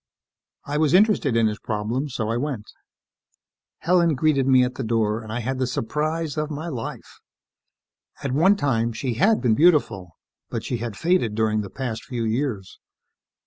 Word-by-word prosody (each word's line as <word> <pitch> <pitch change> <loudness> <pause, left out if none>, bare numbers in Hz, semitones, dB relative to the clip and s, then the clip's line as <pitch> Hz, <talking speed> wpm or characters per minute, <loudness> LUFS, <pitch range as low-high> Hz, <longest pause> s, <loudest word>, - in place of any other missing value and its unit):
I 145 +1 -2
was 155 +1 +3
interested 195 - +3
in 115 - +3
his 105 -1 -1
problem, 115 +7 -2
so 110 -4 -3
I - - 0
went. 125 -4 -3 1.2
Helen 170 -2 +3
greeted 140 -1 +2
me 130 -1 +5
at 125 0 -1
the 135 - -5
door 110 -1 0
and 110 -1 -9
I 120 +2 -2
had 130 +3 -3
the 130 - 0
surprise 155 +5 -2
of 150 0 -1
my 155 +3 -5
life. 125 -7 -7 1.0
At 140 - -2
one 170 +9 +4
time, 120 - 0
she 120 +2 -3
had 205 - +3
been 120 -4 +3
beautiful, 125 - +2 0.3
but - - -4
she 125 - -2
had 115 -3 -5
faded 165 - +1
during 110 -1 +1
the 100 - -7
past 115 +1 -5
few 120 -2 -4
years. 110 -4 -3
125 Hz, 175 wpm, -23 LUFS, 110-150 Hz, 1.2 s, me